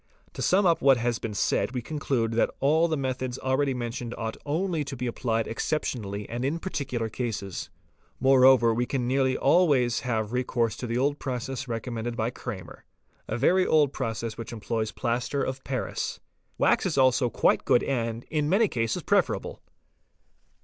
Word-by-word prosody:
To - - -6
sum 195 +2 +3
up 170 -2 +3
what 135 -2 +6
has 120 -1 -1
been 110 -3 -5
said 120 - 0
we 125 - -2
conclude 130 -5 -1
that 115 - +2
all 155 +5 +3
the 160 -2 -1
methods 130 -2 -3
already 130 +1 0
mentioned 120 0 -4
ought 115 -1 -3
only 165 +1 0
to 140 -1 -6
be 125 - -3
applied 115 -2 -1
exceptionally 110 -6 -3
and 120 +2 -4
in 145 +5 0
parti 165 -5 -4
cular 115 -4 -3
cases. 105 -7 -4 0.5
Moreover 130 -3 +6
we 120 +2 0
can 125 -3 -1
nearly 130 0 +2
always 140 -6 +3
have 110 -2 -2
recourse 120 -3 0
to 125 - -5
the. 130 +5 +1
process 130 +1 -4
recommended 115 0 -4
by 115 +2 0
Krahmer®®, 105 -9 -7 0.5
a 110 - -2
very 180 +9 +4
old 150 -3 +3
process 115 -2 -3
which 115 - -6
employs 110 -1 -2
plaster 125 +3 -1
of 130 0 -4
paris. 130 -2 -3 0.4
Wax - - +3
is - - -2
also 130 -1 +4
quite - - +3
as - - -38
good 120 - +4
and, 115 -3 -2
in 150 -1 0
many 210 +5 +4
cases, 115 - -2
preferable. - - 0
125 Hz, 170 wpm, -27 LUFS, 115-135 Hz, 0.5 s, what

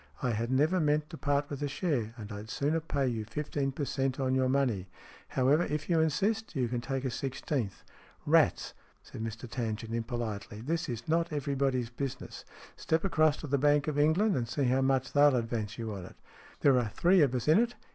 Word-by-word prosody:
I 125 - +1
had 115 +1 -2
never 155 +8 +3
meant 150 0 +1
to 160 - -7
part 145 0 +1
with 145 - -5
a 145 - 0
share, 135 - -2
and 110 -1 -8
I'd 105 +2 -7
sooner 150 +7 0
pay 145 -4 -1
you 115 -3 -2
fifteen 140 +4 -2
per 140 +2 -3
cent, 135 0 -1
on 130 -1 +1
your 130 -1 +2
money. 125 -9 +1 0.4
However, 135 +5 +3
if 150 +1 -2
you 165 - +4
insist, 200 +7 0
you 130 -3 +1
can 120 0 -2
take 135 +2 -3
a 130 - -1
sixteenth." 130 -5 -3 0.4
"Rats!" - - +3 0.3
said - - -9
Mr 115 +2 -5
Tangent, 115 -2 -4
impolitely. 115 -3 -4
"This 165 +6 -2
is 120 -1 -5
not 165 +1 +1
everybody's 135 -4 -1
business. 135 +1 -6 0.3
Step 160 0 0
across 155 -5 +3
to 155 - -6
the 140 0 +1
Bank 145 +1 +3
of 150 -1 0
England, 175 +7 +3
and 120 -2 -2
see 140 - -1
how 130 +1 +2
much 135 -1 +1
they'll 145 -1 +6
advance 115 -3 -2
you 115 -2 -4
on 95 -3 -7
it. - - -13 0.5
There 135 -3 +5
are 115 -3 -1
three 175 - +4
of 135 -4 +3
us 125 - -2
in 155 +6 +6
it. 240 +1 0
135 Hz, 205 wpm, -30 LUFS, 120-150 Hz, 0.5 s, they'll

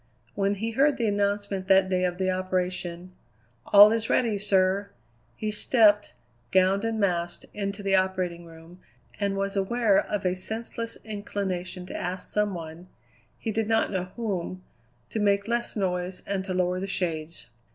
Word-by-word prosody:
When 200 0 0
he 225 +3 -3
heard 275 +4 +3
the 230 - 0
announcement 200 -1 -1
that 190 0 +5
day 185 -1 +1
of 180 -1 -2
the 185 0 +1
operation: 185 -1 -2 0.6
"All 205 +1 +9
is 225 0 -1
ready, 220 -5 +2
sir!" 195 0 +2 0.5
he 215 -1 -3
stepped, 210 - +3 0.4
gowned 190 +2 +3
and 225 -1 -1
masked, 175 -3 -1
into 200 0 -4
the 195 0 +1
operating 185 -2 0
room, 165 +2 -14 0.4
and 200 -1 0
was 195 0 -2
aware 200 +1 +3
of 205 -2 -3
a 180 - +2
senseless 225 +4 -5
inclination 195 -4 -4
to - - -8
ask 180 +1 -4
some 210 -2 +1
one 165 +1 -8 0.5
he 225 - -3
did 220 0 -1
not 225 0 +2
know 185 -2 -1
whom 185 -5 -3 0.5
to 220 - -2
make 200 0 +2
less 235 0 -1
noise 180 -2 -2
and 195 -1 -2
to 190 - -3
lower 180 0 +1
the 195 - -3
shades. 165 -4 -3
195 Hz, 160 wpm, -26 LUFS, 185-210 Hz, 0.6 s, All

